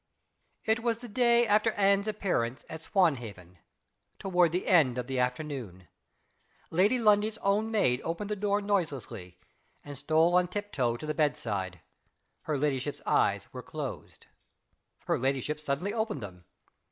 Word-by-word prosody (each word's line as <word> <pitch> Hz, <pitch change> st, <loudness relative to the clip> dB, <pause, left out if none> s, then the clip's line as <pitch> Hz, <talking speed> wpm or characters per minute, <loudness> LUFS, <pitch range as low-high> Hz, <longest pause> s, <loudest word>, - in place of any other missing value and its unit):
It 220 Hz, +1 st, +2 dB
was 230 Hz, -1 st, 0 dB
the 245 Hz, +1 st, -10 dB
day 235 Hz, +1 st, +3 dB
after 215 Hz, +1 st, +3 dB
Anne's 200 Hz, +1 st, +2 dB
appearance 180 Hz, -, -1 dB
at 160 Hz, -, -8 dB
Swanhaven 115 Hz, -, -1 dB, 0.6 s
toward 180 Hz, -3 st, +2 dB
the 180 Hz, +2 st, -2 dB
end 145 Hz, -9 st, +4 dB
of 125 Hz, -, -2 dB
the 130 Hz, 0 st, -2 dB
afternoon. 125 Hz, -, -3 dB, 0.8 s
Lady 200 Hz, +9 st, +3 dB
Lundie's 215 Hz, -1 st, +3 dB
own 205 Hz, +3 st, +2 dB
maid 135 Hz, -, +2 dB
opened 200 Hz, +6 st, -4 dB
the -, -, 0 dB
door 205 Hz, 0 st, 0 dB
noiselessly, 135 Hz, -, -3 dB, 0.5 s
and 145 Hz, -1 st, -7 dB
stole 160 Hz, +5 st, +2 dB
on 180 Hz, 0 st, +4 dB
tip 205 Hz, +3 st, -5 dB
toe 120 Hz, -3 st, 0 dB
to 155 Hz, -, -8 dB
the 155 Hz, -, -2 dB
bedside. 100 Hz, -, -1 dB, 0.6 s
Her 150 Hz, -2 st, -1 dB
ladyship's 140 Hz, 0 st, -2 dB
eyes -, -, +2 dB
were -, -, -6 dB
closed. -, -, -7 dB, 0.8 s
Her -, -, 0 dB
ladyship 135 Hz, +3 st, -1 dB
suddenly 150 Hz, +7 st, -2 dB
opened 220 Hz, -, -2 dB
them. 90 Hz, -3 st, -10 dB
160 Hz, 145 wpm, -29 LUFS, 125-205 Hz, 0.8 s, end